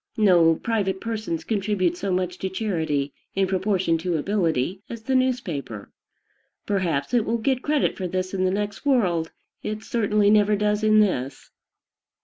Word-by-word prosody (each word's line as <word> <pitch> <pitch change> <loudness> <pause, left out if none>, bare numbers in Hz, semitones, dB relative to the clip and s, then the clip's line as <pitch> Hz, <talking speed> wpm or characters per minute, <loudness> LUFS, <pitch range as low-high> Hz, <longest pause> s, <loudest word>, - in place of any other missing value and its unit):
No 175 -6 +5
private 195 -2 -1
persons 220 -7 -3
contribute 195 -5 0
so 195 +2 -3
much 180 0 -1
to 190 - -2
charity, 160 -9 -2 0.2
in 195 0 +2
proportion 190 -3 0
to 170 0 -1
ability, 175 -1 0
as 230 -2 -7
the 265 - -1
newspaper. 185 - -1 0.7
Perhaps 170 - -1
it 240 -3 +3
will 230 +2 0
get 255 +3 0
credit 295 0 +1
for 185 - -3
this 185 +1 -3
in 185 -1 0
the 185 - +3
next 205 +1 -3
world: 185 - +1 0.3
it 215 +1 -4
certainly 210 -2 +2
never 210 0 +4
does 210 +1 0
in 215 0 +5
this. 135 -9 -2
195 Hz, 155 wpm, -24 LUFS, 175-215 Hz, 0.7 s, No